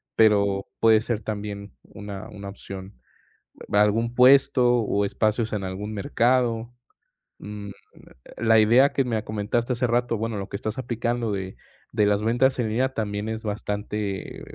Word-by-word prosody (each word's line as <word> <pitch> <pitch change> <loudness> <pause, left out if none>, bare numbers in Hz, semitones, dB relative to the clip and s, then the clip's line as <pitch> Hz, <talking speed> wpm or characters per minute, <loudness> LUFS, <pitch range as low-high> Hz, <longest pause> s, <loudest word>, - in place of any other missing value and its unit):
pero 100 -3 +3
puede 110 -1 +5
ser 115 -1 -2
también 100 -1 -5
una 100 +1 -9
una 100 -2 -8
opción. 95 0 -9 0.8
Algún 105 +3 +2
puesto 125 -1 +5
o 100 -2 0
espacios 110 +2 0
en 105 -2 -2
algún 95 +3 -5
mercado, 115 +2 +1 0.7
mm, 105 -1 -8 0.7
la 115 0 +4
idea 120 +6 +5
que 135 - +1
me 110 -3 -1
comentaste 110 +4 -1
hace 125 +1 0
rato, 120 0 0
bueno, 110 0 -3
lo 100 0 -5
que - - -6
estás 110 +4 -4
aplicando 120 -2 -2
de 95 -1 -4 0.4
de 105 -2 +3
las 105 0 +2
ventas 120 +4 +2
en 115 -3 0
línea 130 +4 0
también 105 -1 -3
es 110 0 -5
bastante 105 -2 -4
110 Hz, 150 wpm, -24 LUFS, 100-120 Hz, 0.8 s, puede